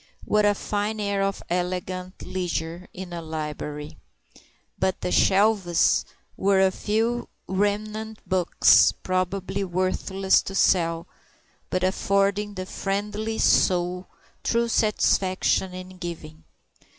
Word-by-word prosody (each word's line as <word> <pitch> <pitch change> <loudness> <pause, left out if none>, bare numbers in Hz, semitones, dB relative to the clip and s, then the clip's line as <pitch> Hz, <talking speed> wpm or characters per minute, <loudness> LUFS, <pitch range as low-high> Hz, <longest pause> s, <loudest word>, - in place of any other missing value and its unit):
What 210 0 +3
a 205 0 +4
fine 210 +2 -2
air 200 -1 0
of 195 0 -1
elegant 180 +1 -3
leisure 175 -1 -3
in 180 -1 -8
a 170 - -4
library! 150 -2 -5 0.8
But 190 0 0
the - - -2
"shelves" 195 -3 +3 0.3
were 195 0 +2
a 190 0 +4
few 225 +5 -1 0.2
remnant 210 +3 -2
books, 185 -2 +5
probably 185 +2 -1
worthless 190 +1 +1
to 195 - -7
sell, 165 -4 +2 0.6
but 185 0 -1
affording 200 +2 +1
the 185 -1 -4
friendly 210 +3 -3
soul 180 0 +2 0.4
true 235 0 +1
satisfaction 190 -4 +1
in 185 0 -9
giving. 160 -3 -8
190 Hz, 110 wpm, -25 LUFS, 180-205 Hz, 0.8 s, books